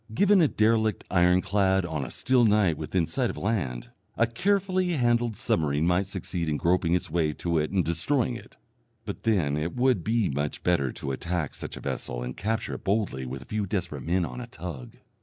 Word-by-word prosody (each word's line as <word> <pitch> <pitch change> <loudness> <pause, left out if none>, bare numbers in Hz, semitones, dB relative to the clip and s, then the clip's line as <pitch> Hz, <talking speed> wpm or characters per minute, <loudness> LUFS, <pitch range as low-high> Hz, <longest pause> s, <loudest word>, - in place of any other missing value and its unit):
Given 200 - +5
a 160 - +5
derelict 110 -3 +2
ironclad 95 +1 +3
on 80 -4 -3
a 65 - -6
still 125 -1 +2
night 105 -6 +4
within 85 +3 -1
sight 120 +9 0
of - - -6
land, 85 - -2 0.3
a 115 - +4
carefully 185 - +1
handled 120 - +1
submarine 75 -1 +1
might 90 +3 +2
succeed 90 -4 -3
in 75 - 0
groping 85 0 +2
its 90 - -2
way 80 -2 +1
to 85 0 -1
it 75 - -1
and 95 -4 +1
destroying 120 - 0
it; - - -12 0.5
but - - -6
then 90 -11 +1
it 80 +3 -3
would 125 -7 +2
be 110 -1 +1
much 75 0 -3
better 75 -8 +2
to 70 - -4
attack 85 +2 -2
such - - -6
a - - -8
vessel - - -4
and 60 +1 -5
capture 110 +3 -2
it - - -7
boldly 95 - -1
with 65 +2 -6
a - - -20
few 105 -2 -2
desperate 90 -7 -3
men 85 +5 0
on 125 - -6
a 120 - -7
tug. 80 - -8
90 Hz, 200 wpm, -27 LUFS, 80-115 Hz, 0.5 s, Given